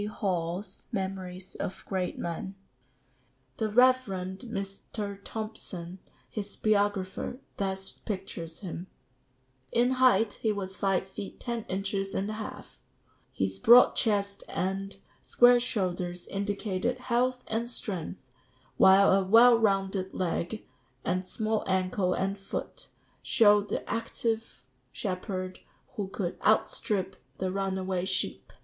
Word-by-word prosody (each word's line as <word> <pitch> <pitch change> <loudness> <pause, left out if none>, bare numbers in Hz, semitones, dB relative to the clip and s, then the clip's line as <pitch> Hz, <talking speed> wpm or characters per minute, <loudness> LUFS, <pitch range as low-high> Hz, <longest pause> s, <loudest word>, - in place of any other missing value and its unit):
Hall's 190 -2 -3
Memories 190 -3 -4
of 185 - -5
Great 185 -2 -2
Men.] 170 +3 -4 1.0
"The 220 -1 0
Rev. 255 +4 +6
Mr. 195 +1 -5
Thomson, 195 -5 -6 0.3
his 205 -2 -6
biographer, 205 +2 0 0.2
thus 190 -1 -2
pictures 185 -5 -6
him: 180 -1 -6 0.8
'In 245 +2 +3
height 225 -4 +4
he 220 - +2
was 190 -2 -4
five 195 -2 +1
feet 190 +1 -8
ten 235 -2 -3
inches 195 0 -2
and 195 - 0
a - - -3
half; 215 0 -8 0.5
his 95 0 -2
broad 240 +2 +8
chest 200 -3 0
and 195 +1 -2 0.3
square 245 0 +6
shoulders 180 -6 -2
indicated 200 +3 -1
health 250 0 0
and 230 +2 -2
strength; 185 - -4 0.6
while 195 +1 +7
a 195 0 +4
well 230 +5 +7
rounded 195 -3 +1
leg, 185 +3 -2 0.4
and 185 +1 0
small 220 +1 -1
ankle 185 0 +1
and 195 +1 -1
foot, - - -6 0.3
showed 210 -3 +5
the - - -3
active 225 - -2 0.3
shepherd 185 -1 -4 0.3
who 210 -6 -4
could 190 -2 -4
outstrip 195 -3 +1 0.2
the 185 0 -1
runaway 190 -1 -1
sheep. 190 0 -1
195 Hz, 115 wpm, -29 LUFS, 185-220 Hz, 1.0 s, broad